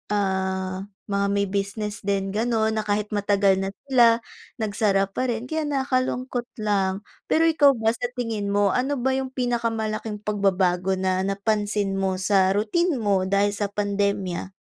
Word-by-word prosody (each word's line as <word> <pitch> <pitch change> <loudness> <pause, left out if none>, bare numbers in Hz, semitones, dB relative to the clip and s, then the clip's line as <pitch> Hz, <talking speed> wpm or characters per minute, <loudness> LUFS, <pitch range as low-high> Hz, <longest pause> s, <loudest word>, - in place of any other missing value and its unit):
ah, 190 -1 -1 0.2
mga 200 0 +1
may 200 - +2
business 205 +2 -3
din 195 -1 -1
ganon 220 0 +1
na - - -2
kahit 210 0 -1
matagal 200 -2 +2
na 195 - -2 0.2
sila 235 -2 +5 0.3
nagsara 205 -3 +1
pa 255 +6 -1
rin 235 -1 -2
kaya 315 -1 -1
nakakalungkot 255 -3 -1 0.2
lang, 195 -1 0 0.2
pero 320 - +3
ikaw 295 -4 +5
ba 225 -1 +1
sa 240 +1 -3
tingin 225 -4 -2
mo 200 -1 +2
ano 265 +3 0
ba 265 0 0
yung 265 0 -3
pinakamalaking 225 -3 -2
pagbabago 190 -3 +1
na 185 0 0
napansin 205 -1 -1
mo 190 -1 0
sa 190 0 +2
routine 315 - +1
mo 200 -5 +1
dahil 200 +1 +2
sa 205 0 -2
pandemya? 200 -2 -2
205 Hz, 150 wpm, -24 LUFS, 195-235 Hz, 0.3 s, sila